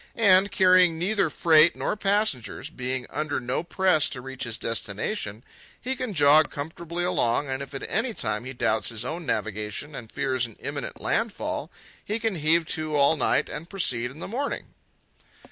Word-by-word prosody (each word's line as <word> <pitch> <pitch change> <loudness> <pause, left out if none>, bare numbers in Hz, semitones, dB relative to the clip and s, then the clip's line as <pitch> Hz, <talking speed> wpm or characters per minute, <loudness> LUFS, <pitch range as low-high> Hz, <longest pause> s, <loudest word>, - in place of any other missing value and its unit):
And, 200 -3 +5
carrying 185 -3 +5
neither 195 +1 +1
freight 160 +1 +5
nor - - -1
passengers, 200 - -1
being 125 0 -3
under 155 -1 -1
no 125 0 -2
press 175 -3 +2
to 125 - -6
reach 130 0 -6
his 115 -2 -3
destination, 105 - -3 0.4
he 260 +2 -2
can 250 -6 -4
jog 150 +1 +6
comfortably 165 +4 -5
along, 145 -6 +1
and 130 +1 -2
if 140 0 -7
at 135 - -4
any 225 +1 -1
time 110 0 -2
he 130 - -5
doubts 110 -3 0
his 115 0 -3
own 165 +3 -5
navigation 105 +7 -3
and 115 -5 -9
fears 130 -2 -1
an 115 - -15
imminent - - -5
landfall, - - -2 0.3
he 210 - -2
can 220 -4 -1
heave 160 +2 +3
to 155 -1 -2
all 140 +2 +5
night 145 - +1
and 160 +4 -7
proceed 125 -11 0
in 135 - -13
the - - -6
morning. 270 +7 -4
155 Hz, 175 wpm, -26 LUFS, 125-185 Hz, 0.4 s, jog